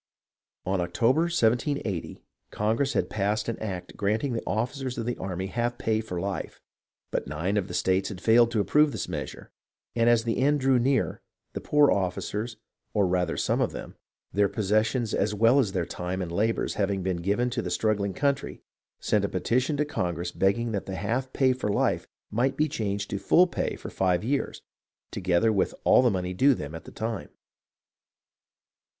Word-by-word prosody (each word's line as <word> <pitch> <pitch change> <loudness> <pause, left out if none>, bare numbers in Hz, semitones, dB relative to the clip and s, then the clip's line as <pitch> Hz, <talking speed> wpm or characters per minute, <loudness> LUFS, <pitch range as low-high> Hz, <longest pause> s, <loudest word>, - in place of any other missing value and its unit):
In 95 0 0
October, 115 - +2
1780, 120 - 0 0.3
Congress 115 +6 0
had - - +1
passed 105 +1 -1
an 115 - -3
act 95 -5 -5
granting 110 +6 0
the 115 - -2
ofificers 125 +3 -2
of 115 - -3
the 120 - -1
army 95 0 -4
half 120 +4 -2
pay 110 -3 0
for 90 -5 -5
life; 100 +1 -4 0.5
but - - -2
nine 80 +8 -2
of 100 -3 0
the - - -6
states 95 +1 +1
had 95 - -7
failed 115 +3 +5
to 115 -2 0
approve 150 +8 +3
this - - -3
measure, - - -6 0.4
and 115 0 +4
as 120 -1 +4
the 115 0 -1
end 145 +3 +3
drew 130 -1 +3
near, 135 +3 +1 0.3
the - - -4
poor 150 -1 +4
officers, 105 +4 -2 0.4
or 100 -2 +4
rather 90 -2 0
some - - +1
of - - 0
them, - - -8 0.4
their 100 0 +3
possessions 110 +3 0
as 105 +1 0
well 115 +6 +5
as 110 -8 +1
their 90 -3 -1
time 90 +2 -4
and 90 -3 -3
labours 110 +6 0
having 100 -2 -1
been 95 -1 -1
given 100 +8 0
to 120 -1 -1
the - - -4
struggling 100 -3 0
country, 140 -1 -1 0.4
sent - - +1
a - - 0
petition 130 +5 0
to 150 - +1
Congress 85 - -2
begging 105 +6 +1
that 100 -3 -3
the 95 - -4
half 130 +6 -2
pay 130 -2 +3
for 125 -4 -3
life - - 0 0.2
might 130 +5 +1
be 155 - +2
changed 100 -8 -2
to 100 - -2
full 180 - +5
pay 180 - -2
for - - -8
five 90 -1 +1
years, 135 +5 -2 0.5
together 95 +3 +2
with 100 - 0
all - - +6
the 125 - +4
money 90 -3 -2
due 135 +8 +4
them 75 -5 -6
at 80 0 -8
the - - -10
time. 110 +1 -4
110 Hz, 185 wpm, -27 LUFS, 95-125 Hz, 0.5 s, all